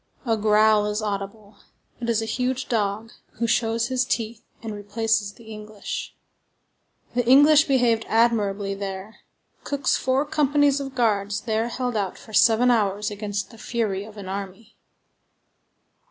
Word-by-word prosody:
A 225 -2 +2
growl 215 0 +3
is 210 0 -1
audible; 205 0 -5 0.4
it 235 -1 -3
is 225 -1 +1
a - - -3
huge 255 +3 -2
dog, 215 -1 -1 0.2
who 235 - -2
shows 230 +1 +1
his 255 -1 +1
teeth 230 -3 -3 0.2
and 220 -1 -5
replaces 205 0 -1
the 235 - -17
English. 215 -1 -7 1.0
The 245 - +1
English 290 +4 +7
behaved 245 -5 +2
admirably 210 -4 +1
there. 195 +1 -6 0.5
Cooke's 285 -1 0
four 260 +2 +1
companies 290 -1 +2
of 270 -1 -6
guards 205 -4 0
there 220 0 -1
held 245 0 -3
out 200 -3 -2
for 220 - -14
seven 230 +4 +5
hours 210 -2 0
against 205 0 -4
the 225 - -15
fury 215 -6 -2
of 215 0 -13
an 200 -2 -8
army. 200 +3 -7
220 Hz, 145 wpm, -24 LUFS, 205-240 Hz, 1.0 s, English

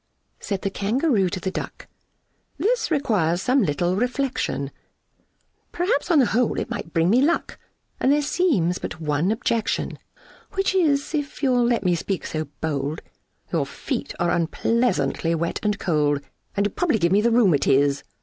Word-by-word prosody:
Said 195 -2 -4
the 195 - -1
Kangaroo 210 - +1
to 185 - -4
the 190 +1 -3
Duck, - - -6 0.7
"This 465 +3 +1
requires 215 - +1
some 255 +7 +2
little 175 0 0
reflection; 245 - -1 1.0
Perhaps 365 +7 0
on 335 - +4
the 270 - +6
whole 240 +1 +1
it - - -4
might 165 - -5
bring 165 0 +2
me 245 +4 +4
luck, 330 +4 0 0.4
And 265 - +3
there 295 +1 +3
seems 265 - +1
but - - -6
one 155 +4 0
objection, 225 -1 -1 0.5
Which 390 0 0
is, 305 -6 +1
if 290 -1 -3
you'll 250 -3 +3
let 235 -4 +1
me 180 -2 +2
speak 185 +2 -2
so 155 0 -3 0.2
bold, 150 -1 -2 0.5
Your - - +1
feet - - -4
are 175 0 +1
unpleasantly 170 - +1
wet 170 +1 -2
and 210 -1 0
cold, 150 -5 +1 0.4
And 200 - +2
would 205 - -3
probably 340 -10 +2
give 170 -3 +1
me 200 +2 +4
the 235 - +3
roo 235 -2 +4
Matiz." 140 -3 +3
205 Hz, 165 wpm, -23 LUFS, 165-270 Hz, 1.0 s, the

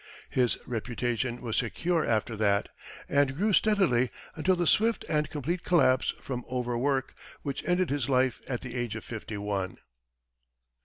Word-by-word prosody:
His 125 -2 +2
reputation 120 +1 -2
was 115 -3 -2
secure 165 +8 0
after 115 0 0
that, 100 -1 +2 0.4
and 140 -2 +2
grew 205 +6 +1
steadily 180 - +3 0.3
until 185 +4 +2
the 175 -1 0
swift 225 +7 +3
and 150 -1 +1
complete 165 +5 -2
collapse 130 -7 +3
from 125 -2 -4
over 125 -1 -1
work, 135 +2 0 0.3
which 140 -2 -3
ended 180 -3 +2
his 140 -2 -1
life 130 -1 +2
at 125 -3 -2
the 125 -3 -7
age 120 -3 -2
of 110 - -6
fifty 110 -2 -6
one. 100 -2 -2
130 Hz, 155 wpm, -29 LUFS, 120-155 Hz, 0.4 s, steadily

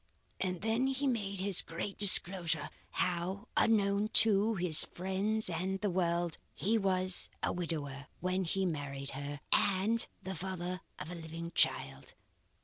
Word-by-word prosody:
And 180 -2 -3
then 225 +5 0
he 270 +1 -2
made 205 -7 -2
his 195 -1 +1
great 170 +4 -6
disclosure, 175 -5 +7 0.2
how, 180 +3 -3
unknown 205 -2 +1 0.2
to, 215 +1 +1
his 175 -4 +4
friends 195 +4 -1
and 185 +3 -3
the 205 -1 -2
world, 175 -2 -2 0.2
he 215 +5 -1
was 185 -3 +2
a - - -1
widower 145 -5 -5
when 185 +1 -2
he 190 +3 -1
married 140 -4 -5
her, 145 +1 -7
and 205 +4 +1 0.2
the 190 - -5
father 180 0 -6 0.2
of 160 - -8
a - - -6
living 165 0 -8
child. 70 - -1
185 Hz, 140 wpm, -32 LUFS, 165-200 Hz, 0.2 s, disclosure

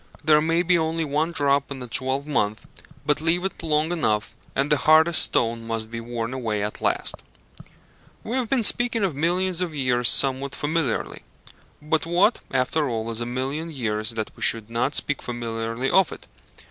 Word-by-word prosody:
There 150 0 +5
may 165 +2 +1
be 175 0 +3
only 160 0 -1
one 150 +3 0
drop 140 -3 +1
in 140 -1 -6
a - - -7
twelvemonth, 130 -4 -1 0.4
but 150 0 +1
leave 170 +3 +1
it 190 - -4
long 155 0 0
enough, 110 -11 -1 0.2
and 140 +2 0
the 150 - +5
hardest 160 +3 +4
stone 115 0 0
must 110 -1 -3
be 115 0 -5
worn 115 +1 -4
away 110 -5 -2
at 105 - -5
last. - - 0 1.1
We 235 - -4
have 250 -4 -1
been 260 -4 +1
speaking 235 0 +3
of 190 -5 0
millions 180 +4 0
of 170 -4 -3
years 125 -3 +3
somewhat 135 +1 +3
familiarly; 150 -4 -2 0.6
but 160 +1 0
what, 180 +7 +3
after 135 +3 0
all, 115 -1 -3
is 115 +1 -2
a 120 - -3
million 135 +6 -3
years 110 -7 -2
that 110 -1 -3
we - - -16
should 115 -1 +1
not 120 +5 -1
speak 145 - +1
familiarly 115 +1 -3
of 190 -3 +4
it? - - -10
140 Hz, 180 wpm, -24 LUFS, 115-165 Hz, 1.1 s, There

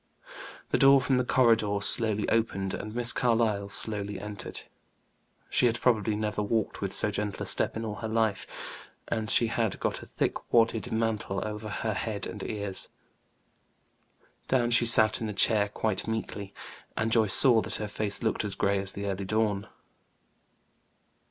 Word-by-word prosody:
The - - +1
door 135 0 +6
from 130 0 0
the - - 0
corridor 115 -5 +2
slowly 105 0 +3
opened, 100 -4 -1
and 110 +1 -7
Miss 120 0 +3
Carlyle 110 -4 0
slowly 100 -1 0
entered. 105 0 -7 0.9
She 125 - +1
had 120 0 -2
probably 110 -4 +1
never 105 0 -3
walked 110 +1 -2
with 100 -1 -3
so 105 - +2
gentle 105 -1 -4
a - - -6
step - - +2
in 115 - -5
all 105 -1 -6
her 110 - -5
life, 110 -2 -1 0.6
and 110 -1 -3
she 120 - +3
had 115 -2 -2
got - - -3
a - - -12
thick - - -4
wadded 115 -1 +1
mantle 110 -3 -2
over 105 0 -7
her 110 +1 -3
head 105 0 -4
and 105 - -8
ears. 100 -2 -4 1.6
Down 120 -2 0
she 120 0 +3
sat 110 -1 +6
in 110 - -3
a - - -5
chair 105 0 +2
quite 105 -1 -3
meekly, 105 -3 -5 0.5
and 115 +1 -1
Joyce 110 -3 +5
saw 120 -5 +7
that - - -4
her 105 - -4
face 105 +1 0
looked 110 - -1
as 100 -2 -2
gray 100 0 0
as 95 0 +1
the 100 - -6
early 100 0 -4
dawn. 105 -1 -1
110 Hz, 170 wpm, -27 LUFS, 100-115 Hz, 1.6 s, saw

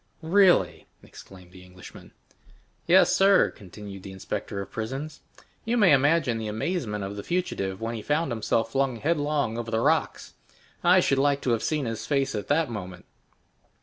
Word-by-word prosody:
"Really!" 185 +2 +3 0.2
exclaimed 90 -2 -15
the 90 0 -14
Englishman. 90 0 -14 0.8
"Yes, 180 +3 +5
sir," 195 0 +4
continued 100 0 -11
the 95 - -9
inspector 95 +1 -5
of 100 - -7
prisons. 135 +7 -6 0.4
"You 235 +2 -1
may 205 -7 +5
imagine 140 -3 +2
the 110 - -4
amazement 110 - -3
of 100 +1 -5
the - - -4
fugitive 95 - -3
when 115 +1 -4
he 115 - -5
found 150 +3 -1
himself 115 0 -1
flung 135 -1 0
headlong 145 -4 -1
over 115 -1 -5
the 110 -1 0
rocks! - - 0 0.5
I 180 +1 +5
should 135 -5 +1
like 140 0 +1
to 125 - -1
have 115 - 0
seen 150 -3 -1
his 115 -1 -5
face 135 -2 0
at 105 -2 -4
that 155 +2 +2
moment." 95 -6 -8
120 Hz, 170 wpm, -26 LUFS, 105-155 Hz, 0.8 s, Yes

